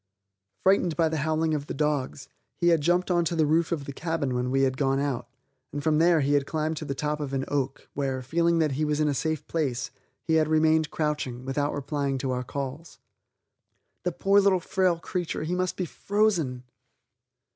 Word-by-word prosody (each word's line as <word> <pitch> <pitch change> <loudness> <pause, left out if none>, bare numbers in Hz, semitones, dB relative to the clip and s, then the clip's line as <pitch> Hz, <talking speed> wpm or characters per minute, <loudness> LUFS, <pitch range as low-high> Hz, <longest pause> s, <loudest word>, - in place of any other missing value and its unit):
Frightened 185 -4 +3
by 165 -2 +3
the 160 - -2
howling 155 +1 0
of 145 -1 -2
the - - -4
dogs, 145 -2 -1 0.3
he 175 - +2
had 165 -3 +4
jumped 175 +4 +2
onto 170 -1 +1
the 160 -1 +3
roof 160 +3 +2
of 150 -5 -2
the 140 - -6
cabin 160 -4 -2
when 125 0 -1
we 135 +1 +2
had 130 -1 +2
gone 135 0 +1
out, 140 -4 -2 0.4
and 145 0 -4
from 155 -1 +2
there 165 -1 +4
he 140 +1 +1
had 140 -1 +2
climbed 155 0 -1
to 155 - -5
the 140 - -3
top 150 +2 -2
of 140 -2 -4
an 135 0 -1
oak, 140 -1 -2
where, 135 -2 -2
feeling 170 +5 +2
that 155 -3 +2
he 140 +3 -1
was 150 0 0
in 155 - +2
a 145 - +1
safe 155 +3 -2
place, 135 -6 -2 0.3
he 160 - 0
had 155 - +1
remained 155 0 +3
crouching, 150 -5 -2
without 145 +2 0
replying 140 -1 -2
to 130 0 -2
our 125 0 -1
calls. 140 +5 -6 1.0
The 180 - -1
poor 195 +4 +3
little 195 -2 +4
frail 180 0 +1
creature, 175 -1 -3
he 165 +3 -2
must 185 0 -1
be 185 - -1
frozen! 175 -10 0
150 Hz, 205 wpm, -27 LUFS, 140-165 Hz, 1.0 s, had